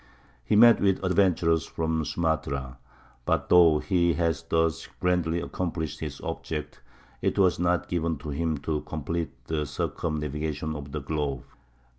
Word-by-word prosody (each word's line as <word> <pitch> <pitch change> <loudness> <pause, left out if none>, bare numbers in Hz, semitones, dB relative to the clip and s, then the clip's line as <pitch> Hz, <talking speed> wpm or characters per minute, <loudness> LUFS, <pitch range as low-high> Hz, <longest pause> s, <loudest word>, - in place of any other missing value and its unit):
He 65 - +1
met 115 +2 +7
with 95 -1 +2
adventurers 90 -4 +2
from 80 -1 -1
Sumatra. 70 -6 -2 0.4
But, - - 0
though 85 -3 +7
he 85 0 +2
had 85 -2 +1
thus 80 -1 +1
grandly 90 -2 +1
accomplished 85 -3 -3
his - - -5
object, 75 -2 -5 0.4
it - - 0
was 95 -4 +3
not 90 0 +1
given 85 -2 -1
to 75 +2 -8
him 80 +2 -1
to 75 0 -1
complete 80 +1 -3 0.2
the 75 0 -2
circumnavigation 75 +1 -3
of 70 -1 -7
the 75 +1 -4
globe. 70 -3 -2
80 Hz, 140 wpm, -27 LUFS, 75-85 Hz, 0.4 s, met